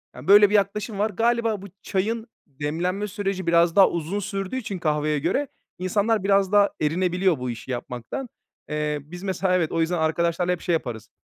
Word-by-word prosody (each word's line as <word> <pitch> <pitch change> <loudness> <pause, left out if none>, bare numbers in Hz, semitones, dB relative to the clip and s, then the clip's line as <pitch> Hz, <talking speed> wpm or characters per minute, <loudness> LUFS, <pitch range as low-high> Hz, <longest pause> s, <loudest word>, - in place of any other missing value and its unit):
Yani - - -10
böyle 205 +1 +8
bir 210 - +1
yaklaşım 205 +1 0
var. 210 +2 +2
Galiba 230 0 0
bu 200 - -9
çayın 220 +4 -2 0.2
demlenme 165 +8 -2
süreci 195 -2 -3
biraz 170 0 +4
daha 195 - +7
uzun 170 +4 -3
sürdüğü 195 +3 -4
için 210 -7 -4
kahveye 150 -2 0
göre 185 - 0 0.3
insanlar 205 +3 +1
biraz 195 -1 +3
daha 205 -1 +5
erinebiliyor 180 +2 +1
bu 125 0 -3
işi 120 +2 -6
yapmaktan. 125 - -5 0.4
Eee, 150 -1 -1
biz 175 +6 -10
mesela, 190 -1 0
evet, 170 -4 +1
o 165 - 0
yüzden 170 +2 0
arkadaşlarla 170 +2 +1
hep 180 - -2
şey 175 - 0
yaparız. 120 -8 -3
185 Hz, 180 wpm, -24 LUFS, 160-205 Hz, 0.4 s, böyle